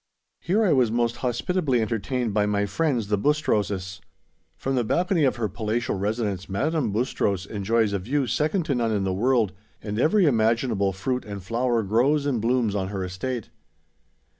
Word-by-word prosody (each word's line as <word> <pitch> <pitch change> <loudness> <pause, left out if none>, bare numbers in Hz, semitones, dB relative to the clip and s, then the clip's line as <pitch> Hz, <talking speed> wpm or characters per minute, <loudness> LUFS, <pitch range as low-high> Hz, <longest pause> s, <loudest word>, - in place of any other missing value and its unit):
Here 200 +6 +1
I 185 - +4
was 125 -4 +3
most 120 +1 0
hospitably 130 +3 0
entertained 115 +1 -1
by 105 0 +2
my 105 0 +1
friends, 120 -1 -1
the 105 -1 +1
Bustroses. 100 - 0 0.6
From 135 - -2
the 125 -2 +1
balcony 175 - +1
of 130 - +2
her 115 -3 -1
palatial 110 +4 -2
residence 100 -1 -2
Madame 135 +4 0
Bustros 100 -4 -1
enjoys 105 +1 0
a 100 - 0
view 135 +9 0
second 155 - 0
to 140 - 0
none 120 -3 0
in 105 -2 0
the 95 -1 0
world, 115 -1 +2 0.3
and 105 0 -4
every 180 - +4
imaginable 115 -5 +2
fruit 125 +7 -2
and 100 -3 -7
flower 115 +3 0
grows 130 +9 +2
and 130 -6 0
blooms 115 -2 +1
on 95 -2 -1
her 95 -1 -4
estate. 105 +6 -4
115 Hz, 170 wpm, -25 LUFS, 100-130 Hz, 0.6 s, I